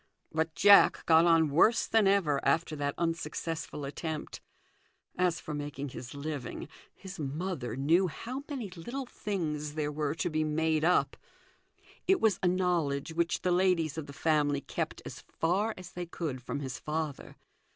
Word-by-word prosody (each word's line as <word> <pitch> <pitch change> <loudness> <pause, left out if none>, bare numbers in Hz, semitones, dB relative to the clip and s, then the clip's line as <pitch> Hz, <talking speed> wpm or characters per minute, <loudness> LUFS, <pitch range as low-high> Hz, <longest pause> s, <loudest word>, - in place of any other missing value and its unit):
But 160 0 -1
Jack 200 +6 +6
got 160 0 +6
on 165 -3 +4
worse 215 +10 +4
than 220 -3 +3
ever 170 -8 +2
after 155 +2 +1
that 145 -1 -2
unsuccessful 165 -2 -3
attempt. 155 +2 -5 0.7
As 180 -2 +1
for 155 - -6
making 145 -1 -4
his 125 +1 -8
living, 140 -2 -5 0.3
his 190 -1 -10
mother 145 - -3
knew 165 +8 +3
how 250 - -6
many 250 -9 -4
little 240 +10 -5
things 155 -10 -3
there 150 -1 -1
were 150 0 -2
to 170 - -2
be 155 0 +1
made 155 0 +1
up. 175 +2 +2 0.9
It 385 -1 +4
was 210 -4 +2
a 185 - +2
knowledge 170 -5 0
which 170 +1 0
the 180 - +2
ladies 175 -4 +2
of 160 -2 -5
the - - -8
family 145 -1 +1
kept - - -4
as - - -7
far 200 +7 -1
as 180 -1 -10
they 175 -1 -5
could 155 -7 -4
from 140 +3 -4
his 130 -2 -5
father. 155 -2 -4
160 Hz, 160 wpm, -30 LUFS, 145-180 Hz, 0.9 s, Jack